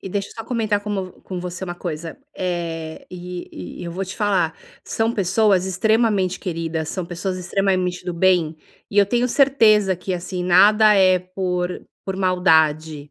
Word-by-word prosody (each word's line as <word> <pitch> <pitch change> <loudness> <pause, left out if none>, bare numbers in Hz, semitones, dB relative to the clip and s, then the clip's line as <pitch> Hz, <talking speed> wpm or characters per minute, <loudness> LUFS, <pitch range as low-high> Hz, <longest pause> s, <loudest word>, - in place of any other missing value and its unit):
e 190 - -7
deixa 200 +1 -3
eu - - -13
só 225 - -7
comentar 220 -4 0
como 200 -3 -4
com 185 -2 -6
você 180 +1 -5
uma 175 -1 -5
coisa, 165 -2 -6 0.2
eh, 165 -3 -4
e 180 - -8
e - - -6
eu 170 - -5
vou 190 +2 -3
te 185 - -8
falar 190 -7 +1 0.3
são 225 +1 0
pessoas 195 -1 +2
extremamente 205 -1 +1
queridas, 165 -3 -3
são 185 0 -3
pessoas 180 +2 -4
extremamente 185 -1 -1
do 180 - -3
bem. 170 -3 +2 0.3
E 205 - 0
eu 200 - +6
tenho 245 +3 +1
certeza 215 -9 +4
que, 180 +1 -4
assim, 180 +1 -4
nada 210 +4 +6
é 185 -2 +5
por 180 -1 -3 0.2
por 190 -1 -4
maldade, 160 -5 +2
185 Hz, 170 wpm, -21 LUFS, 175-200 Hz, 0.3 s, eu